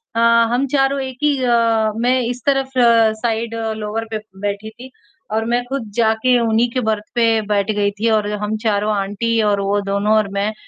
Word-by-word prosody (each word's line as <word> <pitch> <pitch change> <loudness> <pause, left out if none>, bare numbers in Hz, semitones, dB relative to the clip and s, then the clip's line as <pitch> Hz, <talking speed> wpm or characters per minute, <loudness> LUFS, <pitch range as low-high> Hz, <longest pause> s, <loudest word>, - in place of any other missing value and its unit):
अ, - - 0 0.3
हम 265 +3 +1
चारों 275 0 +1
एक 260 -1 -6
ही 290 -2 +2
अ, 230 -2 +2
मैं 250 +2 +2
इस 245 +1 -4
तरफ़ 270 -1 +1 0.5
साइड 230 0 -1 0.2
लोअर 215 +1 -4
पे 220 - -1 0.3
बैठी 205 +2 -4
थी 250 +4 -13 0.4
और 220 +1 0
मैं 240 +1 0
ख़ुद 245 -5 -5
जाके 235 +2 +2
उन्हीं 230 +1 +1
के 255 - -1
बर्थ 210 -1 -1
पे 235 -1 +3 0.3
बैठ 205 +1 +1
गई 205 -1 0
थी 230 +1 +1
और 210 -1 +1
हम 215 +1 -2
चारों 210 -1 +1
आंटी 215 +3 -1
और 205 -1 +1
वो 200 +1 0
दोनों 200 +2 0
और 210 -2 +1
मैं, 205 +2 -1
225 Hz, 190 wpm, -18 LUFS, 210-245 Hz, 0.5 s, पे